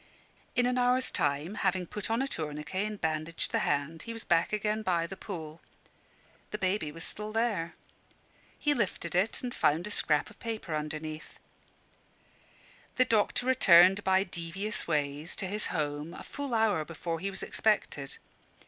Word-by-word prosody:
In 245 - +3
an 250 0 +1
hour's 250 +1 +3
time, 145 +5 0
having 190 -3 0
put 210 +4 -4
on 230 +4 +2
a - - -1
tourniquet 150 - -2
and 210 -1 -6
bandaged 160 0 -2
the - - +2
hand, 150 +3 -1
he 230 - -6
was 225 - -7
back 165 - +2
again 215 +1 0
by 175 -5 +1
the 195 - -7
pool. 165 -6 -7 0.9
The 210 - -3
baby 185 -5 0
was 165 +2 -6
still 210 +1 0
there. 215 -7 0 0.8
He 295 - +2
lifted 190 - -2
it 190 +8 +1
and 245 -1 -3
found 155 +4 +2
a 210 - -4
scrap 150 -6 +2
of - - -19
paper 220 -7 -4
underneath.... 155 +1 -5 1.6
The 255 - +4
doctor 225 +2 +2
returned 195 -6 +7
by 190 0 +4
devious 185 +3 -3
ways 150 0 -1
to - - -3
his 210 +3 -2
home, 150 +1 -2
a - - -8
full 280 -4 -4
hour 215 -8 +3
before 165 +1 -4
he 195 +4 -2
was 190 - -4
expected. 150 -10 0
185 Hz, 165 wpm, -30 LUFS, 155-215 Hz, 1.6 s, returned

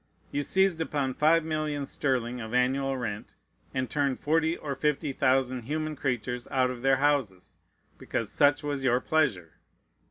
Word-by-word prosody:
You 145 - -1
seized 190 +1 +2
upon 145 -4 -1
five 160 +4 +3
millions 155 -3 -2
sterling 125 -3 -1
of 110 +2 -5
annual 135 +2 +1
rent, 105 -4 -5 0.4
and 130 -1 -2
turned 140 -2 -1
forty 160 +2 +1
or 145 -2 -4
fifty 145 0 -1
thousand 130 -2 +1
human 155 +2 -2
creatures 125 -3 -3
out 130 -1 +1
of 125 -1 -8
their 135 0 +3
houses, 135 -11 -1 0.4
because 110 - -3
"such 145 0 +3
was 145 -2 -2
your 125 -1 +3
pleasure." 125 - 0
135 Hz, 155 wpm, -28 LUFS, 125-150 Hz, 0.4 s, five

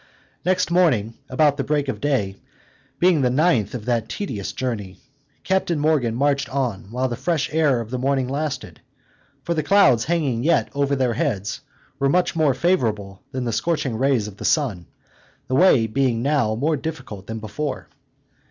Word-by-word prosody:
Next 185 0 +1
morning, 140 - +2 0.2
about 145 +2 +3
the 135 - -1
break 145 -1 0
of 135 - -4
day, 115 -10 0 0.6
being 175 -4 +3
the 125 - +3
ninth 130 - +2
of 110 -4 -6
that 120 -2 0
tedious 115 - -4
journey, 105 -7 -4 0.5
Captain 190 -3 0
Morgan 145 -6 +1
marched 140 +1 +1
on 125 -8 -2
while 125 +3 -1
the 120 - -3
fresh 160 +2 -1
air 150 -6 +3
of 115 0 -6
the 130 - -2
morning 135 0 +1
lasted; 140 +1 -4 0.6
for 170 - -1
the 160 - 0
clouds 150 - +4
hanging 145 -9 0
yet 170 +3 +2
over 140 0 +1
their 130 -3 +1
heads, 110 - -2 0.4
were 135 0 +2
much 180 +4 +1
more 155 -5 +2
favorable 110 - 0
than 130 -1 -3
the 120 -2 -2
scorching 140 -1 -1
rays 130 -3 +1
of 100 -2 -10
the - - -8
sun, 115 - 0 0.6
the 130 - -1
way 135 -9 +5
being 115 +1 0
now 135 -7 +1
more 150 +7 +1
difficult 130 -10 -6
than 110 - -4
before. 110 +7 -4
135 Hz, 170 wpm, -22 LUFS, 115-155 Hz, 0.6 s, way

